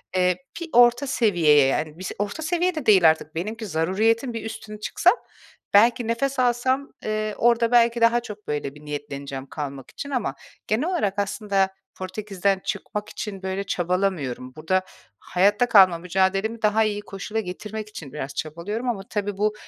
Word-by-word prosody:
eee, 180 -1 +3 0.2
bir 340 - -5
orta 245 +3 +5
seviyeye, 170 - +4
yani, 155 +3 -1
bis 185 - -5
orta 205 +10 -3
seviye 350 +2 +1
de 310 -5 -4
değil 190 -6 +7
artık. 155 0 -2
Benimki 215 +7 -4
zaruretin 215 +8 +1
bir 225 -1 -5
üstüne 215 -1 -7
çıksa 210 - +3 0.6
belki 230 +3 +5
nefes 265 +4 -1
alsam, 255 +3 +1 0.2
eee, 215 0 -2
orada 235 0 +3
belki 235 -1 +4
daha 230 +1 +5
çok 210 -2 -10
böyle 145 -1 -3
bir 150 - -14
niyetleneceğim 140 -2 -6
kalmak 140 -3 -6
için 285 - -7
ama 245 - -2 0.3
genel 240 +10 +1
olarak 205 - -1
aslında 200 -1 0 0.3
Portekiz'den 195 0 -2
çıkmak 210 +2 -4
için, 195 -3 -6
böyle, 190 +1 -2
çabalamıyorum. 175 -9 -1
Burada 160 +5 +1 0.4
hayatta 205 +6 +2
kalma 190 -6 +7
mücadelemi 195 +5 0
daha 215 +1 +3
iyi 205 -1 -1
koşula 205 +2 -5
getirmek 210 +2 -6
için 150 -10 -9
biraz 140 -2 -5
çabalıyorum. 195 +10 -3
Ama 215 -5 -2
tabii 205 -1 -2
bu, 210 +1 +1
205 Hz, 160 wpm, -24 LUFS, 180-230 Hz, 0.6 s, değil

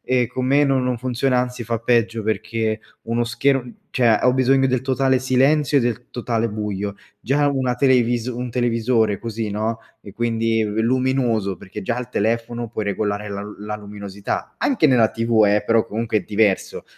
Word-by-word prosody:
ehm, 125 -1 +1
con 125 +1 -3
me 140 +2 +4
no 135 -1 +2
non 125 -1 0
funziona, 125 +1 0
anzi 125 -1 -4
fa 115 0 -2
peggio 115 -1 +1
perché 110 +1 -1 0.2
uno 115 +1 -1
scher 125 +2 0 0.2
cioè, 115 -4 +3
ho 125 - +4
bisogno 135 +1 +3
del 130 -1 +1
totale 130 0 +2
silenzio 135 +3 +3
e - - +2
del 120 0 -2
totale 115 -1 -1
buio, 105 -1 -4 0.3
già 145 +6 +1
una 130 -3 0
televis 120 -3 +2
un 125 0 -4
televisore 115 -3 +1
così, 115 -2 -4
no, 110 +2 -2 0.2
è 100 - -12
quindi 115 -1 0
luminoso, 115 -2 0
perché 100 +4 -9
già 105 +4 -2
al 125 -2 -5
telefono 115 +2 -1
puoi 110 -1 -4
regolare 105 +1 -2
la 100 0 -4
l 105 +1 -8
la 105 0 -4
luminosità, 100 -1 -6
anche 235 - +2
nella 120 -4 +4
TV 115 -1 +2
eh, 105 +1 +2
però 115 +1 +2
comunque 110 0 -1
è - - -4
diverso, 105 -2 0
115 Hz, 175 wpm, -21 LUFS, 110-125 Hz, 0.3 s, me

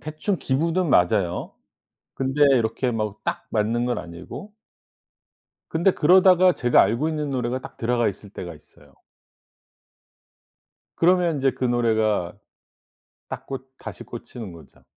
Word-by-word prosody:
대충 155 +6 -3
기분은 165 +6 0
맞아요. 90 -3 +1 0.6
근데 135 +2 -3 0.2
이렇게 115 +2 -1
막 110 -2 -3
딱 - - -3
맞는 115 +2 0
건 125 - -1
아니고. 90 - -9 1.2
근데 170 +4 +3
그러다가 185 +2 +5
제가 120 0 +4
알고 115 +10 0
있는 150 -2 -3
노래가 125 0 -2
딱 - - -11
들어가 120 0 +1
있을 100 +1 -8
때가 90 -3 -7
있어요. 75 -2 -21 2.0
그러면 175 -2 +3
인제 135 -1 +2
그 - - -4
노래가 110 -6 +1 1.0
딱 - - -7
꽂 135 -1 -7
다시 - - -9
꽂히는 110 -6 -9
거죠. 85 -1 -16
125 Hz, 260 characters per minute, -23 LUFS, 110-155 Hz, 2.0 s, 그러다가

